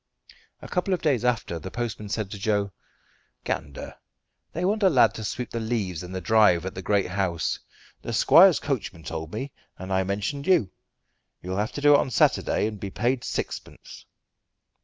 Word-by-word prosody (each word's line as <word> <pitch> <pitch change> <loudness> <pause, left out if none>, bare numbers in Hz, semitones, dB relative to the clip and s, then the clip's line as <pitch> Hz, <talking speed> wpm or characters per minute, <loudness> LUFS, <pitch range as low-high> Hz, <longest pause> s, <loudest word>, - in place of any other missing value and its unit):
A - - -7
couple 185 +1 0
of - - -10
days 140 -7 +2
after 115 -9 0
the 90 - -7
postman 110 -2 -4
said 105 -2 -3
to 100 - -6
Joe 100 -1 0 0.7
"Gander, 70 -2 -4 0.6
they - - -2
want 210 +3 +1
a 195 - +6
lad 120 - +4
to 110 - -6
sweep 120 +4 -4
the 115 - -3
leaves 110 -7 -2
in 90 0 -8
the 95 - -3
drive 95 -2 +4
at 95 - -4
the 95 - -6
great 100 +1 +1
house. 90 -4 -1 0.4
The - - -5
squire's 160 - +6
coachman 115 - -4
told 80 +1 -5
me, 135 +6 -5 0.3
and 95 +1 -5
I 95 0 +2
mentioned 105 +9 -3
you. 150 - +3 0.7
You'll 95 +1 -3
have 105 +4 -1
to 145 - -5
do 145 0 +6
it 140 - +6
on - - -1
Saturday, 115 - +2
and 105 -1 -4
be 100 - -5
paid 120 +5 -1
sixpence." - - -6
105 Hz, 185 wpm, -25 LUFS, 95-130 Hz, 0.7 s, a